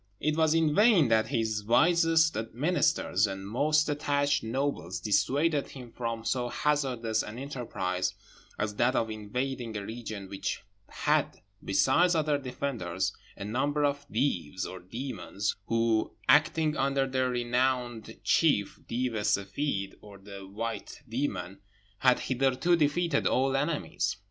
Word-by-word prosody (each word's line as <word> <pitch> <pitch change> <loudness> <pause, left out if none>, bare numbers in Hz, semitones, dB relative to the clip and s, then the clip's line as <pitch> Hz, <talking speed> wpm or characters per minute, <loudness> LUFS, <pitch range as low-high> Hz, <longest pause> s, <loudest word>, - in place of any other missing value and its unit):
It 155 +1 0
was 160 0 +3
in 160 -2 +3
vain 205 - +5
that 110 -1 +3
his 110 -2 -1
wisest 165 - +4 0.2
ministers 130 - +2
and 95 0 -6
most 150 +8 +2
attached 145 -1 +1
nobles 115 - -2
dissuaded 140 +8 +1
him 125 -3 -10
from 115 -1 -4
so 125 -2 0
hazardous 125 -7 0
an 105 +2 -7
enterprise 105 -9 -3 0.4
as 105 0 -2
that 125 +2 +2
of 115 -1 0
invading 115 +2 -3
a 100 - -5
region 110 -3 -6
which 95 0 -4 0.3
had, - - 0 0.3
besides 130 - +3
other 150 -2 +1
defenders, 120 -9 -3 0.2
a 100 - -6
number 145 +7 0
of 145 0 -2
Deevs, 95 - -1
or 95 - -7
demons, 105 0 -4
who, 115 -1 +1
acting 155 +2 +4
under 135 -1 +1
their 130 -1 0
renowned 120 -2 -1
chief, 140 -12 +2
Deev 125 0 -1
e 110 - -2
Seffeed, 100 0 -1
or 100 -1 -13
the 100 0 -10
White 115 +7 -5
Demon, 100 -7 -3 0.4
had 125 -1 +4
hitherto 135 +6 +2
defeated 160 0 +1
all 135 +1 +2
enemies. 135 - -1
125 Hz, 135 wpm, -29 LUFS, 105-145 Hz, 0.4 s, vain